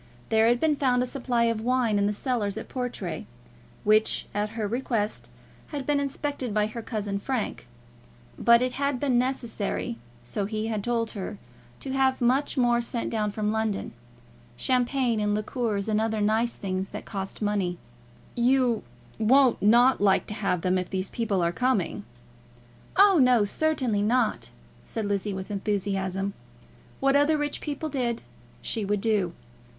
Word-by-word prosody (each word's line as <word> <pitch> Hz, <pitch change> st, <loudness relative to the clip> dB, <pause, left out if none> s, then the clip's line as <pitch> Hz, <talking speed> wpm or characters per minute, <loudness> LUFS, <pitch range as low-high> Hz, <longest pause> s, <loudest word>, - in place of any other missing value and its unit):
There 220 Hz, 0 st, +4 dB
had 240 Hz, +1 st, +3 dB
been 305 Hz, 0 st, +2 dB
found 250 Hz, -3 st, +2 dB
a -, -, -1 dB
supply 245 Hz, -2 st, 0 dB
of 230 Hz, -2 st, +1 dB
wine 240 Hz, -3 st, +2 dB
in 200 Hz, -, +2 dB
the -, -, +1 dB
cellars 210 Hz, -3 st, -1 dB
at -, -, -6 dB
Portray, 195 Hz, -, -4 dB, 0.6 s
which 215 Hz, +1 st, +3 dB
at 210 Hz, +2 st, -2 dB
her 215 Hz, -2 st, -1 dB
request 230 Hz, -2 st, -2 dB, 0.4 s
had 285 Hz, -3 st, -5 dB
been 290 Hz, -1 st, +2 dB
inspected 280 Hz, -4 st, -2 dB
by 210 Hz, 0 st, +3 dB
her 220 Hz, +2 st, -5 dB
cousin 205 Hz, -3 st, -3 dB
Frank; 240 Hz, -, -3 dB, 0.7 s
but 235 Hz, +1 st, +5 dB
it 255 Hz, -, 0 dB
had 280 Hz, 0 st, -1 dB
been 255 Hz, -3 st, +2 dB
necessary, 235 Hz, -, -2 dB, 0.2 s
so 195 Hz, -, -2 dB
he 215 Hz, +1 st, -3 dB
had 215 Hz, -2 st, -2 dB
told 230 Hz, -1 st, 0 dB
her, 205 Hz, 0 st, -5 dB, 0.4 s
to 270 Hz, -, -5 dB
have 265 Hz, -1 st, +2 dB
much 260 Hz, +4 st, +1 dB
more 240 Hz, -1 st, +3 dB
sent 235 Hz, 0 st, -3 dB
down 215 Hz, -2 st, 0 dB
from 210 Hz, 0 st, -1 dB
London, 220 Hz, -2 st, -1 dB, 0.7 s
champagne, 250 Hz, -, +1 dB
and 210 Hz, 0 st, +1 dB
liqueurs, 215 Hz, -1 st, -1 dB
and 215 Hz, 0 st, +1 dB
other 220 Hz, -1 st, 0 dB
nice 220 Hz, +3 st, +1 dB
things 190 Hz, -1 st, -3 dB
that -, -, -7 dB
cost 195 Hz, -2 st, -5 dB
money. 200 Hz, -4 st, 0 dB, 0.6 s
"You 245 Hz, -1 st, +2 dB, 0.4 s
won't 255 Hz, +3 st, +4 dB
like 240 Hz, +5 st, +5 dB, 0.2 s
not -, -, -24 dB
to -, -, -3 dB
have 195 Hz, -4 st, -1 dB
them 185 Hz, +1 st, +2 dB
if 180 Hz, -, -4 dB
these 190 Hz, 0 st, -3 dB
people 205 Hz, -6 st, 0 dB
are 170 Hz, -, +2 dB
coming?" 205 Hz, -3 st, 0 dB, 0.9 s
"Oh, 390 Hz, -3 st, +7 dB
no; 250 Hz, -5 st, +5 dB
certainly 255 Hz, -4 st, +1 dB
not," 230 Hz, +2 st, +1 dB, 0.3 s
said 225 Hz, -3 st, -4 dB
Lizzie, 200 Hz, 0 st, -1 dB
with 190 Hz, +2 st, -6 dB
enthusiasm. 195 Hz, -1 st, -1 dB, 0.7 s
What 275 Hz, 0 st, +3 dB
other 290 Hz, +2 st, +4 dB
rich 295 Hz, -1 st, -3 dB
people 300 Hz, +1 st, -3 dB
did, 240 Hz, -4 st, -2 dB, 0.4 s
she 225 Hz, -, -2 dB
would 205 Hz, 0 st, 0 dB
do. 205 Hz, -6 st, +1 dB
225 Hz, 160 wpm, -26 LUFS, 205-255 Hz, 0.9 s, Oh